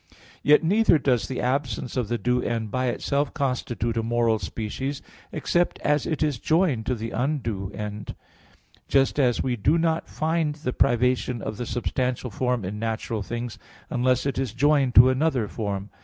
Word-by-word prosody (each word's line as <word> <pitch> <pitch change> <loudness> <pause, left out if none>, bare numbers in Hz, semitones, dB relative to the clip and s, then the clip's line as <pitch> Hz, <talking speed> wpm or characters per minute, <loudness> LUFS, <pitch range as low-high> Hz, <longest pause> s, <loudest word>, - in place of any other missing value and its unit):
Yet 150 +3 +5
neither 200 +1 +4
does 130 -5 +1
the 130 - -4
absence 125 -2 -1
of 125 -4 0
the 120 +2 -1
due 125 +1 +1
end 115 -3 -2
by 130 +2 0
itself 140 +4 -1
constitute 125 -4 -1
a - - +2
moral 115 -1 +1
species, 115 - -4 0.3
except 175 0 0
as 150 0 +1
it 155 -1 0
is 145 -6 0
joined 155 -9 +1
to 125 - +1
the 115 0 -5
undue 115 -8 -2
end; 105 0 -6 0.7
just 135 +1 +2
as 125 -4 +2
we 125 -2 0
do 140 +9 +2
not 165 -1 0
find 160 -1 0
the 135 -5 -4
privation 125 0 +1
of 110 - -5
the 120 - -4
substantial 125 0 -2
form 125 -1 -1
in 105 +3 -5
natural 110 -1 -2
things, 120 +3 -5 0.3
unless 125 +1 +1
it 140 -2 -1
is 130 -5 -2
joined 140 -2 +3
to 125 +2 +9
another 130 -4 +1
form. 100 -2 -4
125 Hz, 170 wpm, -25 LUFS, 115-140 Hz, 0.7 s, to